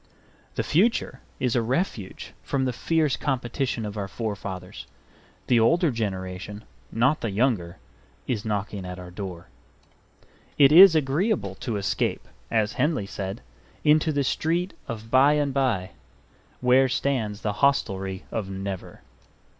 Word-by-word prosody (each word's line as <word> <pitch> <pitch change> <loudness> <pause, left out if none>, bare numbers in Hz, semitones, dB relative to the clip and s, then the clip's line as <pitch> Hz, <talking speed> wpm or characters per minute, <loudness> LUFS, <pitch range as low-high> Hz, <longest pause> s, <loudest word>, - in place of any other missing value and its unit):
The - - 0
future 180 - +1 0.2
is 125 -2 0
a 120 - +3
refuge 120 - -3
from 135 -1 -1
the 125 - -1
fierce 155 +1 +1
competition 125 -3 -2
of 105 0 -6
our 100 -1 -3
forefathers. 100 -4 -6 0.6
The 120 - +4
older 165 +8 +3
generation, 100 -2 -4 0.3
not 130 +7 +2
the 115 - -1
younger, 100 -5 0 0.5
is 110 -5 -2
knocking 105 -2 -3
at 90 0 -6
our 90 -1 -9
door. 90 -2 -7 1.1
It 140 -1 +7
is 180 +2 +10
agreeable 155 - +1
to 120 -5 -2
escape, 100 -1 -1 0.2
as 110 -1 +1
Henley 145 -6 0
said, 100 +1 -5 0.4
into 155 +1 +4
the 145 -1 0
Street 170 +6 0
of 115 -1 -7
By 135 +3 +6
and 145 -2 0
Bye, 115 -9 0 0.7
where 130 +1 +4
stands 120 -6 -1
the 105 -2 -1
Hostelry 95 -9 +1
of 105 -4 -3
Never. 95 -1 -6
115 Hz, 135 wpm, -25 LUFS, 100-140 Hz, 1.1 s, is